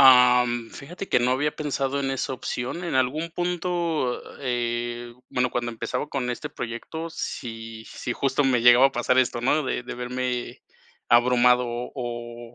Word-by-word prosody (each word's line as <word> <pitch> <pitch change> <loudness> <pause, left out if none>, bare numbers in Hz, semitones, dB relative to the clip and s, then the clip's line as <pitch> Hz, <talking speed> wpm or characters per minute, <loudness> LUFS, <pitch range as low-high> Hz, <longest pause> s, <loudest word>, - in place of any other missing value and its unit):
Am, 125 -3 +6
fíjate 175 +7 -8
que - - +4
no 125 +1 +2
había 145 +3 +1
pensado 140 -2 -1
en 135 -1 -1
esa 135 0 -2
opción. 130 +7 -4
En 170 - -2
algún 145 +6 +1
punto, 175 -6 -1 0.2
eh 120 -1 -2 0.2
bueno, 125 0 0
cuando 120 0 -2
empezaba 115 +5 -3
con 125 -3 -2
este 120 - -4
proyecto, 140 +8 -5
sí 115 -6 -6
sí, 125 - -4
justo 135 +2 +1
me 125 -3 +3
llegaba 125 +2 +8
a 135 - -2
pasar 125 +2 +2
esto, 120 -2 +2
¿no?, 145 +4 +2
de 125 - -2
de - - -6
verme 125 0 -3 0.5
abrumado 125 +1 +5
o 120 -1 -6
125 Hz, 160 wpm, -25 LUFS, 120-135 Hz, 0.5 s, llegaba